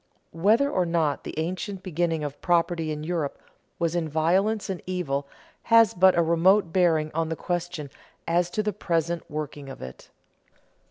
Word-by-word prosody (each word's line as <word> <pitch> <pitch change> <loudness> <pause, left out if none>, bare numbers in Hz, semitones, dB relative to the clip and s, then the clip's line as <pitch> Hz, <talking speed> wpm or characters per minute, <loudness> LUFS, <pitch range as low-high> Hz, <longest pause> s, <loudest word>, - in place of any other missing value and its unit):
Whether 215 - +3
or 185 -10 0
not 160 -4 0
the - - -7
ancient 185 +4 -3
beginning 170 -3 -1
of 145 -1 -6
property 170 -2 +1
in 150 0 -4
Europe 160 -3 -2 0.4
was 170 -1 0
in 165 -2 -1
violence 185 +8 +1
and 190 -3 -4
evil 145 -7 -2 0.4
has 230 -3 +6
but 185 0 +5
a 170 - +4
remote 170 +2 +3
bearing 160 -4 +2
on 165 0 -1
the 160 - -2
question 175 -4 -4 0.4
as 175 +1 +2
to 215 +4 -1
the 210 0 -1
present 170 -3 -1
working 150 -2 -5
of 135 - -9
it. 65 0 -10
170 Hz, 165 wpm, -26 LUFS, 155-185 Hz, 0.4 s, has